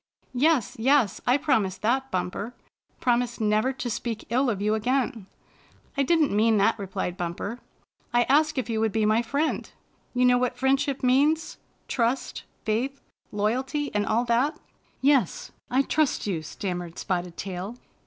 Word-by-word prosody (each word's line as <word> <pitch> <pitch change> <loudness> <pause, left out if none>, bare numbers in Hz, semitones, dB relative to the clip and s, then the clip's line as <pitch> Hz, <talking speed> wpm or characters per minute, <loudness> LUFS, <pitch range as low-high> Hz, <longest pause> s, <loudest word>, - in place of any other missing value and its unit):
Yes, 275 -2 +2
yes, 260 -2 +3
I 250 +3 +5
promise 220 -11 +1
that. 260 +5 0
Bumper 195 +5 -3 0.2
— - - -41
^promise 245 -1 +1
never 215 +3 +2
to 260 - -5
speak 230 -1 -3
ill 255 +2 +2
of 205 -4 -1
you 210 +1 +1
again." 240 -1 0 0.7
''I 280 - +1
didn't 315 +1 +3
paean 220 +1 +4
that," 210 +3 +3
replied 185 -2 -3
Bumper. 180 +6 -4 0.5
"I 240 0 +4
asked 305 +4 +3
if 255 - -1
you 225 -2 -1
would 220 -1 +1
be 220 0 +1
my 215 +2 +3
friend. 280 +7 -1 0.5
You 250 0 +3
know 250 0 +5
what 250 0 -1
friendship 270 +1 +1
means? 290 +5 +2
— - - -40
^trust, 240 +1 -1 0.2
faith, 245 +6 -1 0.3
loyalty, 260 +8 -1
and 205 -1 0
all 235 +3 +2
that?" 245 +6 +1 0.4
"Yes, 270 -8 +2 0.2
I 260 +2 +3
trust 310 0 +1
you," 185 -6 -1
stammered 175 +1 -5
Spotted 180 -2 -3
Tail. 190 +3 -5
240 Hz, 160 wpm, -26 LUFS, 210-265 Hz, 0.7 s, I